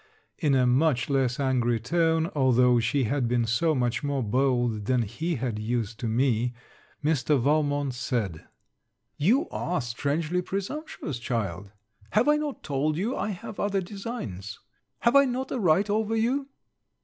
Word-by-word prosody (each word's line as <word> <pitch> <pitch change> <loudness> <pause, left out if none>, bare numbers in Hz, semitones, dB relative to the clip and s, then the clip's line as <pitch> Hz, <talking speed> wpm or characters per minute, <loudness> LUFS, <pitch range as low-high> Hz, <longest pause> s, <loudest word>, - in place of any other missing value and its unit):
In 145 -4 +2
a 130 -1 +4
much 130 0 +2
less 135 0 +1
angry 125 -4 +1
tone, 160 +6 +1
although 125 -3 +4
she 130 +4 +1
had 125 +2 0
been 120 -1 +1
so 155 +8 +1
much 120 -1 0
more 140 -2 -1
bold, 120 -2 +1
than 125 0 +2
he 140 - -3
had 120 -4 -3
used 115 0 -2
to 120 - -2
me, 120 0 +1 0.5
Mr. 150 -2 +2
Valmont 145 0 +1
said, 115 -10 -3 0.7
'You 225 - +3
are 180 +1 -2
strangely 145 +8 -1
presumptuous, 195 - -5
child. 100 -6 -3 0.4
Have 220 +5 +3
I 300 0 +5
not 300 -2 -4
told 150 +1 0
you, 220 +9 -1
I - - -2
have 200 +1 -7
other 200 -1 +1
designs. 175 - -6 0.4
Have 235 +3 +3
I 280 0 +7
not 260 +1 -3
a 255 - -1
right 185 +1 +3
over 215 +1 0
you?' 255 +5 0
140 Hz, 155 wpm, -27 LUFS, 120-180 Hz, 0.7 s, I